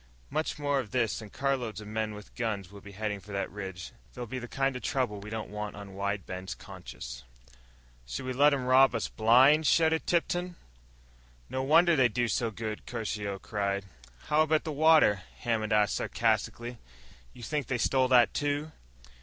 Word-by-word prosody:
Much 155 +1 -1
more 145 -1 +1
of 120 -6 -4
this 115 -4 0
and 105 -2 -10
carloads 130 -6 -1
of 105 - -9
men 110 0 -2
with 105 -1 -12
guns 105 -6 -3
will 100 -1 -11
be 100 +1 -12
heading 105 0 -3
for 105 +1 -11
the 100 - -1
ridge. 95 -3 -7 0.2
There'll 120 - -5
be 130 +3 -5
the 120 - -7
kind 135 +1 0
of 125 - -5
trouble 125 -6 -1
we 100 +2 -9
don't 110 -1 -5
want 105 0 -5
on 100 -1 -9
Wide 100 0 -2
Bend's 95 0 -6
conscience." 60 +1 -9 0.8
"Should 65 - -5
we 130 - -2
let 145 +3 +5
'em 135 -3 -1
rob 130 0 +5
us 115 - -2
blind?" 130 +8 +5
shouted 160 +1 +3
Tipton. 175 +1 0 1.0
"No 130 - -1
wonder 165 +5 +5
they 130 -4 +4
do 120 +1 0
so 115 0 0
good!" 110 0 -6
Caruso 105 -4 -3
cried. 100 -1 -2 0.4
"How 150 +1 +2
about 155 0 +2
the 160 - -4
water?" 150 - +5 0.2
Hammond 110 -3 -1
asked 105 0 +3
sarcastically. 115 +1 -1 0.5
"You 120 - -13
think 145 -1 -2
they 130 - 0
stole 130 +2 +2
that, 125 -2 +5
too?" 145 +1 -1
115 Hz, 185 wpm, -29 LUFS, 105-135 Hz, 1.0 s, let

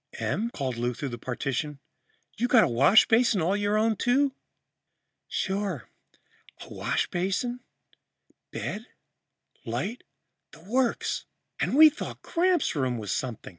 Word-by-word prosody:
"Em," 230 +3 -1
called 130 - -4
Lou 120 +1 -1
through 140 +3 -4
the 120 -1 -7
partition, 135 +4 -3 0.6
"you 230 +5 0
got 235 -3 +6
a - - +3
washbasin 215 - +5
all 180 +4 +1
your 205 +1 +1
own, 220 +1 +2
too?" 265 +5 +2 0.9
"Sure. 190 - -3 0.8
Washbasin, 195 +8 -1 0.9
bed, 220 +3 -5 0.8
light 225 +6 -4 0.5
the 150 - -15
works. 245 +5 0 0.3
And - - 0
we 310 +1 +9
thought - - -7
Gramps' 360 - +1
room 130 -4 0
was 105 -4 -4
something. 125 -4 -4
200 Hz, 120 wpm, -27 LUFS, -, 0.9 s, we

